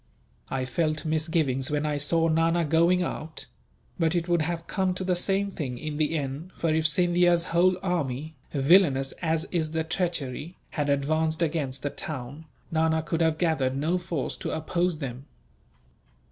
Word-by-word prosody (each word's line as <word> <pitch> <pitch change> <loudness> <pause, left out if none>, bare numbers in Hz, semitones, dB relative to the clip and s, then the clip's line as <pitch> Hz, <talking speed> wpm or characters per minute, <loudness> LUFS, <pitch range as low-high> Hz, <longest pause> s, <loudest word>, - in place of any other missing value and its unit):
"I 130 -1 -1
felt 155 +4 -1
misgivings 155 -4 0
when 150 0 0
I 150 -1 -1
saw 165 +3 +2
Nana 165 +1 +2
going 170 +4 +3
out; 160 -1 -5 0.5
but 165 0 +2
it 170 0 0
would 175 -2 +2
have 165 +1 -2
come 190 -2 0
to 185 - -4
the 185 -1 +1
same 195 +2 0
thing, 130 -8 -4
in 150 +2 -5
the 155 +1 +1
end, 145 +5 -4
for 165 -2 +1
if 160 0 +3
Scindia's 175 +1 +3
whole 180 +2 +4
army, 155 -4 -2 0.2
villainous 140 -2 +4
as 160 -2 0
is 160 -3 -1
the 160 0 0
treachery, 165 -2 -3
had 145 -2 -1
advanced 155 +3 +1
against 145 -5 -2
the 145 - -1
town, 145 +1 -6 0.3
Nana 160 0 +2
could 165 +1 -2
have 160 -1 +2
gathered 150 -7 +1
no 165 +6 +1
force 170 -5 -3
to - - -4
oppose 175 +1 0
them." 135 -1 -6
160 Hz, 165 wpm, -27 LUFS, 145-170 Hz, 0.5 s, whole